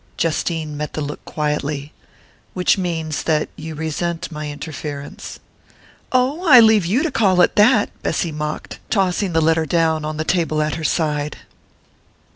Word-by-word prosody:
Justine 160 Hz, -1 st, -1 dB
met 150 Hz, 0 st, -4 dB
the 155 Hz, -, -3 dB
look 145 Hz, 0 st, -5 dB
quietly. 150 Hz, -1 st, -3 dB, 0.6 s
"Which 180 Hz, -1 st, +3 dB
means 165 Hz, -5 st, -2 dB
that 155 Hz, -2 st, 0 dB
you 160 Hz, 0 st, -7 dB
resent 160 Hz, +2 st, -3 dB
my 150 Hz, -1 st, -5 dB
interference 145 Hz, -1 st, -7 dB, 0.3 s
" -, -, -29 dB, 0.3 s
"Oh, 265 Hz, +7 st, +1 dB
I 255 Hz, -4 st, +10 dB
leave 220 Hz, -5 st, +5 dB
you 230 Hz, +10 st, +2 dB
to 335 Hz, -, -1 dB
call 190 Hz, -5 st, +2 dB
it -, -, +3 dB
that!" 215 Hz, +1 st, +4 dB
Bessy 170 Hz, -, -1 dB
mocked, 150 Hz, 0 st, -5 dB
tossing 190 Hz, -2 st, +1 dB
the 160 Hz, -, +3 dB
letter 160 Hz, 0 st, +2 dB
down 160 Hz, 0 st, +1 dB
on 155 Hz, 0 st, -4 dB
the 155 Hz, -, -1 dB
table 165 Hz, -3 st, 0 dB
at 155 Hz, -1 st, 0 dB
her 160 Hz, -, -5 dB
side. 150 Hz, -2 st, -1 dB
160 Hz, 160 wpm, -20 LUFS, 150-180 Hz, 0.6 s, I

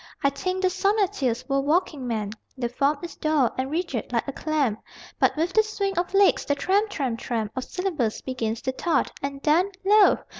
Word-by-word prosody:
I 280 Hz, -, +4 dB
think 370 Hz, +6 st, -3 dB
the 370 Hz, -, +4 dB
sonneteers 380 Hz, -, 0 dB
were 275 Hz, 0 st, +1 dB
walking 295 Hz, -3 st, 0 dB
men: 215 Hz, -3 st, -2 dB, 0.3 s
The 240 Hz, -2 st, -1 dB
form 280 Hz, +4 st, +1 dB
is 345 Hz, -, -6 dB
dour 305 Hz, -6 st, +2 dB
and 260 Hz, +1 st, -2 dB
rigid, 305 Hz, -, -3 dB
like 235 Hz, +1 st, 0 dB
a -, -, -2 dB
clamp, 280 Hz, -7 st, -1 dB, 0.4 s
But -, -, +3 dB
with 335 Hz, +4 st, 0 dB
the 435 Hz, -, +6 dB
swing 405 Hz, -2 st, -2 dB
of 355 Hz, +2 st, -1 dB
legs 400 Hz, 0 st, +5 dB
the 285 Hz, -, 0 dB
tramp, 400 Hz, +8 st, +1 dB
tramp, 260 Hz, -, -2 dB
tramp 225 Hz, -4 st, -2 dB
Of 260 Hz, -, -3 dB
syllables 330 Hz, -, -2 dB
begins 230 Hz, -3 st, -3 dB
to 260 Hz, -, 0 dB
thud, 330 Hz, +6 st, 0 dB
and 275 Hz, 0 st, -5 dB
then 335 Hz, +6 st, +3 dB, 0.2 s
Lo! 415 Hz, +1 st, +6 dB
295 Hz, 195 wpm, -25 LUFS, 255-370 Hz, 0.4 s, the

